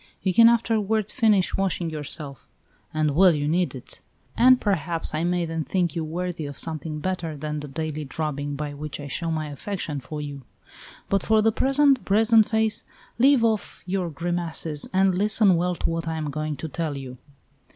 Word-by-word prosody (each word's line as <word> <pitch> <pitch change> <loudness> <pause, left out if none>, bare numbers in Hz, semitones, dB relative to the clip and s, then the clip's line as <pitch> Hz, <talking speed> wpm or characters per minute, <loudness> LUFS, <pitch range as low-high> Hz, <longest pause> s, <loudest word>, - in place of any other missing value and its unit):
You 190 - +1
can 230 +4 +8
afterward 220 -2 +1
finish 215 -6 +2
washing 180 -3 -1
yourself 145 - -5 0.4
and 155 -2 0
well 180 -1 +6
you 145 0 -1
need 170 0 0
it 125 - -10 0.3
and 255 +1 +6
perhaps 170 -6 -1
I 155 +1 -1
may 175 0 0
then 165 -1 -3
think 175 -1 -1
you 165 - -1
worthy 170 0 -4
of 145 - -8
something 155 -1 -3
better 175 -3 -3
than 150 +1 -4
the 150 - -7
daily 155 +1 -4
drubbing 145 0 -3
by 145 0 -4
which 150 +1 -7
I 145 - -6
show 165 +4 -3
my 155 -2 -2
affection 155 -1 -4
for 150 +4 -7
you. 145 -2 -6 0.7
But 195 -1 +1
for 220 +1 +3
the 225 - +4
present, 275 +2 +3
brazenface, 220 +1 +3 0.4
leave 265 -1 +5
off 220 -2 -1
your 180 -1 -2
grimaces, 165 -1 -1
and 190 0 +3
listen 205 0 +3
well 175 +1 0
to - - -2
what 165 0 -3
I 160 0 -2
am 150 -2 -3
going 155 0 -3
to 160 - -5
tell 155 -1 -3
you." 130 -2 -8
165 Hz, 185 wpm, -24 LUFS, 150-195 Hz, 0.7 s, can